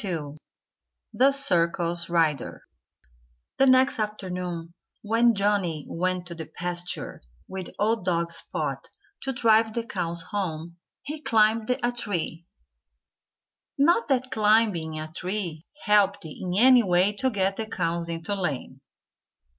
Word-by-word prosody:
XXII 155 -7 -4 0.8
THE 270 +2 +4
CIRCUS 170 -9 +1
RIDER 165 -4 0 0.9
The 270 - +4
next 260 -1 +4
afternoon, 180 -5 -4 0.3
when 230 +2 +3
Johnnie 195 -6 0
went 180 +1 -2
to 175 - -6
the 165 -2 -7
pasture 175 0 -4 0.3
with 190 -2 -6
old 220 0 +1
dog 170 -2 0
Spot - - -2 0.3
to 270 - -2
drive 225 -2 +3
the 235 -1 -2
cows 170 -5 -2
home, 170 -4 -4 0.3
he 300 +1 -6
climbed 220 -2 +2
a 245 -1 0
tree 180 -8 -4 1.3
not 340 +11 +3
that 260 -2 0
climbing 210 -8 +2
a 155 - -5
tree 180 -3 -4 0.2
helped 200 -2 +3
in 180 +3 -5
any 250 +2 +7
way 185 0 +2
to 260 +3 +3
get 195 -3 -1
the 220 - -3
cows 170 -4 -2
into 165 +3 -4
the 195 - -4
lane! 135 -5 -4
190 Hz, 130 wpm, -26 LUFS, 170-225 Hz, 1.3 s, any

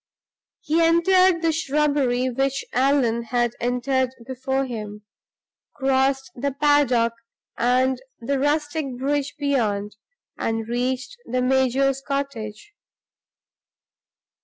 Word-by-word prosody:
He 315 +3 +1
entered 340 +1 +4
the 330 - +3
shrubbery 285 -5 +1
which 270 +2 -1
Allan 255 -3 +2
had 240 0 0
entered 250 +1 0
before 265 +1 -2
him; 210 -4 -7 0.7
crossed 270 -1 +1
the 280 +3 -2
paddock 270 -5 +3 0.4
and 255 +1 +2 0.2
the 270 +4 -1
rustic 290 -2 -1
bridge 280 +2 -1
beyond; 215 -8 -1 0.4
and 225 -1 -2
reached 255 - -2
the 250 +1 0
major's 265 +1 +2
cottage. 275 - -5
265 Hz, 95 wpm, -23 LUFS, 245-285 Hz, 0.7 s, entered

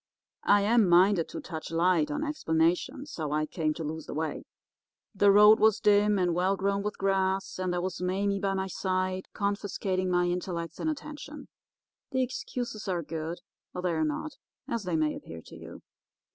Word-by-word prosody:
"I 205 0 +6
am 220 -2 +4
minded 180 0 +4
to - - -6
touch 160 -3 -7
light 165 -1 +2
on 145 - -2
explanations 180 - 0
how 155 -3 -3
I 155 +1 +1
came 155 -1 -1
to 165 - -5
lose 155 0 -5
the - - -6
way. 160 0 -3 0.7
The 200 0 +4
road 210 +2 +7
was 220 0 +4
dim 210 -1 +4
and 180 -2 +1
well 185 +3 +1
grown 200 +1 0
with 210 +1 -4
grass; 190 -1 0
and 185 -1 -1
there 175 0 -1
was 180 -1 -4
Mame 195 +2 0
by 195 -1 0
my 190 0 -1
side 185 0 -2
confiscating 200 -2 -1
my 180 0 +2
intellects 175 -2 -3
and 315 - -1
attention. 300 -1 -7 0.6
The 260 -2 +1
excuses 245 -3 -5
are 175 -3 -1
good 160 +2 -5 0.3
or 180 - -4
they 180 - +1
are 160 -1 0
not, 155 - -3 0.3
as 230 -4 -3
they 180 -2 -1
may 155 -1 +1
appear 80 0 -9
to - - -12
you. - - -11
185 Hz, 185 wpm, -28 LUFS, 170-205 Hz, 0.7 s, road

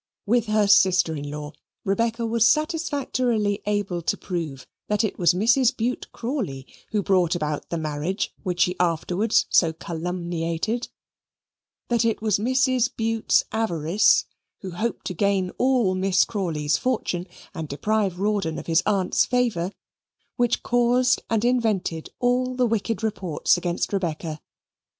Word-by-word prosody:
With 235 +1 +2
her 215 -1 +3
sister 185 -4 +4
in 145 -1 -5
law, 150 0 -6 0.3
Rebecca 230 +3 0
was 230 0 +3
satisfactorily 255 -9 0
able 205 -4 -1
to - - -1
prove 160 -8 -5 0.2
that 210 +1 +1
it 215 - -2
was 175 -1 +4
Mrs. 240 +5 +3
Bute 240 +3 -2
Crawley 230 - -4 0.2
who 210 -2 0
brought 180 -3 +2
about 150 -3 -3
the 170 - -2
marriage 155 +4 -2
which 180 -3 -2
she 180 - +3
afterwards 180 +5 +1
so 165 -2 +4
calumniated; 170 +5 -3 1.0
that 235 -1 +2
it 230 -1 +1
was 215 -3 +1
Mrs. 255 +1 +2
Bute's 225 0 +2
avarice 185 -4 +2 0.4
who 190 -3 -6
hoped 220 +7 -3
to 185 - -3
gain 190 0 +1
all 250 -7 +3
Miss 185 0 +2
Crawley's 160 -9 -1
fortune 195 -8 -1 0.3
and 160 -2 -5
deprive 195 +5 -1
Rawdon 195 -6 0
of - - -6
his 165 0 +3
aunt's 195 -3 +2
favour 230 -8 0 0.6
which 245 -2 +1
caused 245 +1 +2
and 225 0 +1
invented 215 -10 0
all 255 +1 +1
the 250 0 +2
wicked 225 0 -1
reports 190 -7 +1
against 175 +2 -2
Rebecca. 160 -4 -3
200 Hz, 140 wpm, -24 LUFS, 170-230 Hz, 1.0 s, sister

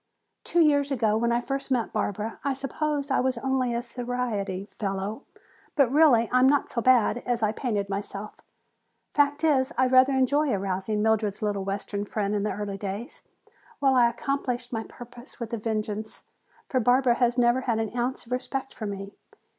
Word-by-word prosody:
"Two 345 - +2
years 285 -3 +3
ago 225 -6 +1
when 235 +2 +1
I 235 - +2
first 275 +3 -4
met 245 -4 0
Barbara 210 +1 -2
I 280 0 0
suppose 280 +2 -2
I - - +3
was 260 -1 0
only 260 0 0
a 235 - -2
society 235 -6 -3
fellow, 200 +4 -3 0.5
but 275 -5 +3
really 275 -6 +5
I 255 0 +4
was 260 - +6
not 290 0 +1
so 235 - -1
bad 245 -2 +4
as 240 -2 -1
I 215 - +3
painted 215 -4 -2
myself. 200 +1 -6 0.7
Fact 290 +1 +2
is, 270 -5 +3
I 260 - +4
rather 255 +1 +5
enjoyed 270 +2 +2
arousing 195 +2 -1
Mildred's 215 -1 +1
little 205 -2 -1
western 200 +1 -3
friend 205 -1 -2
in 205 - 0
the 210 - -1
early 200 -1 -4
days. 200 +4 -5 0.6
Well, 270 -1 +3
I 240 -2 +5
accomplished 250 -1 -3
my 225 -1 -2
purpose 245 0 -12
with 235 -1 -5
a - - 0
vengeance, 215 0 -3 0.4
for 255 - +1
Barbara 245 +1 +4
has 245 0 +2
never 240 +1 +3
had 235 -3 0
an 225 +1 -3
ounce 245 +1 -2
of 235 - -17
respect 265 +1 -3
for 215 - -5
me. 200 0 -6
240 Hz, 185 wpm, -26 LUFS, 210-260 Hz, 0.7 s, was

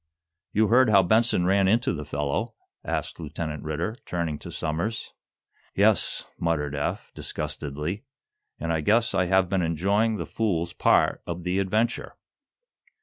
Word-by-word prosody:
"You 110 0 +2
heard 125 +1 +5
how 100 -2 +6
Benson 110 -1 +3
ran 95 +1 +3
into 115 +2 +2
the 75 -3 -5
fellow?" 75 - -2 0.3
asked - - -3
Lieutenant 80 -1 -5
Ridder, 80 +9 -3
turning 85 -4 -2
to - - -9
Somers. 85 +7 -3 0.6
"Yes," - - +2
muttered 75 -4 0
Eph, 70 0 -3
disgustedly, 75 +5 -4 0.6
"and 85 +1 -1
I 80 - 0
guess 115 +7 +3
I 95 -1 +2
have 95 +1 +3
been 95 0 0
enjoying 100 +7 +1
the - - -3
fool's 85 -6 -1
part - - +3
of 85 0 -4
the 90 +2 0
adventure!" 110 +5 0
90 Hz, 145 wpm, -26 LUFS, 80-105 Hz, 0.6 s, how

